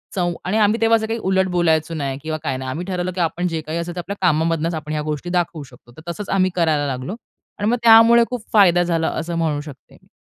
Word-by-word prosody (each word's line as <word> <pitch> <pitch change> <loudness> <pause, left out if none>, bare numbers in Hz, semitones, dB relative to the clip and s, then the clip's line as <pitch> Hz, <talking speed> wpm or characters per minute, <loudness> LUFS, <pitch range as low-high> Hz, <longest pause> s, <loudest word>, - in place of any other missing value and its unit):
चों 175 -2 0
आणि 200 +4 0
आम्ही 215 +2 +2
तेव्हा 225 0 +4
असं 220 - -3
काही 225 +1 -3
उलट 190 0 +2
बोलायचो 165 -1 +1
नाही 140 -3 -3
किंवा 155 0 -3
काय 130 -1 -2
नाही. 130 0 -5
आम्ही 170 +7 -4
ठरवलं 185 -1 -3
की 180 - -1
आपण 175 +2 -1
जे 165 -2 -3
काही 155 +2 -5
असेल 170 +1 -4
ते - - -4
आपल्या 200 +3 -5
कामामधूनच 165 +1 +1
आपण 155 -1 -6
ह्या 155 0 -1
गोष्टी 150 +4 -5
दाखवू 175 -3 -1
शकतो. 125 -2 -18
तर 170 +2 -7
तसंच 205 +3 -7
आम्ही 185 -1 +2
करायला 155 -4 +1
लागलो. 130 +8 -4 0.4
आणि 205 +2 0
मग 245 - +2
त्यामुळे 230 +1 +7
खूप 245 -3 -5
फायदा 180 -4 +5
झाला 165 -2 0
असं 170 +1 -4
म्हणू 155 -3 -1
शकते 145 -3 -13
मी. - - -28
170 Hz, 245 wpm, -20 LUFS, 155-190 Hz, 0.4 s, त्यामुळे